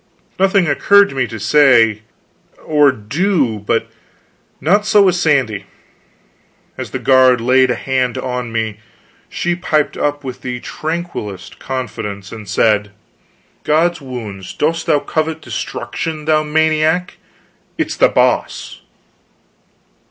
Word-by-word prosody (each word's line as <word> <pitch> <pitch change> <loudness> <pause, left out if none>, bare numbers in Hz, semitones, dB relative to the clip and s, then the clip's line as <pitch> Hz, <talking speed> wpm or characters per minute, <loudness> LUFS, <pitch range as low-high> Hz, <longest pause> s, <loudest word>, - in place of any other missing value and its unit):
Nothing 195 -1 +3
occurred 200 +6 +4
to - - -9
me 130 -2 0
to 115 -1 -8
say 115 -3 +4 0.6
or 150 -2 +4
do. 130 - -1
But 105 - -1 0.7
not 200 +8 +2
so 210 -1 +4
with 185 -2 +4
Sandy. 135 - +1 1.1
As - - -6
the - - -4
guard 130 -2 +4
laid 130 +2 +3
a 125 - +1
hand 130 -2 -1
upon 125 -2 -4
me, 110 -2 -3 0.5
she 175 - -1
piped 155 -4 0
up 145 0 -1
with 130 -2 -7
the 125 -1 -4
tranquilest 155 - -6
confidence, 105 -7 -5
and 110 -4 -9
said: 105 -1 +2 0.7
"God's 160 +3 +1
wounds, 110 -8 -7
dost 165 +2 -1
thou 155 -3 +4
covet 155 +2 -2
destruction, 160 -1 -5
thou 155 0 +3
maniac? 160 +3 +1 0.6
It - - +1
is - - -5
The - - +5
Boss!" - - 0
135 Hz, 125 wpm, -17 LUFS, 115-160 Hz, 1.1 s, The